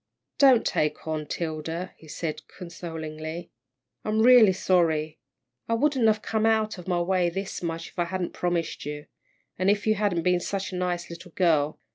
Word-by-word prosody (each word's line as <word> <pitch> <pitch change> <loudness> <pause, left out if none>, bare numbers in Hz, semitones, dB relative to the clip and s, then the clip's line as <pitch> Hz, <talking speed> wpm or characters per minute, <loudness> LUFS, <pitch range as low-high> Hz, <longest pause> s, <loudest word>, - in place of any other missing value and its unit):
"Don't 265 -4 +6
take 150 +1 -1
on, 155 -1 -3
'Tilda," 165 +3 -4
he 160 - -17
said, 155 +1 -4
consolingly. 165 -1 -7 0.5
"I'm 215 +1 +1
real 240 -4 +8
sorry. 160 -4 +1 0.5
I 230 - +2
wouldn't 265 -2 +2
have 215 0 +2
come 220 0 +1
out 220 -2 +1
of 180 - -11
my 175 -2 +1
way 180 0 +2
this 195 +3 -5
much 165 -1 -4
if - - -12
I 175 - +2
hadn't 180 0 -3
promised 175 -2 -2
you, 150 +1 -6 0.5
and 185 +1 +3
if 205 0 +1
you 215 - +4
hadn't 200 -5 0
been 180 -1 +3
such 195 +2 -3
a - - -5
nice 175 -1 -2
little 170 0 -10
girl. 155 -5 +2
175 Hz, 175 wpm, -26 LUFS, 165-200 Hz, 0.5 s, real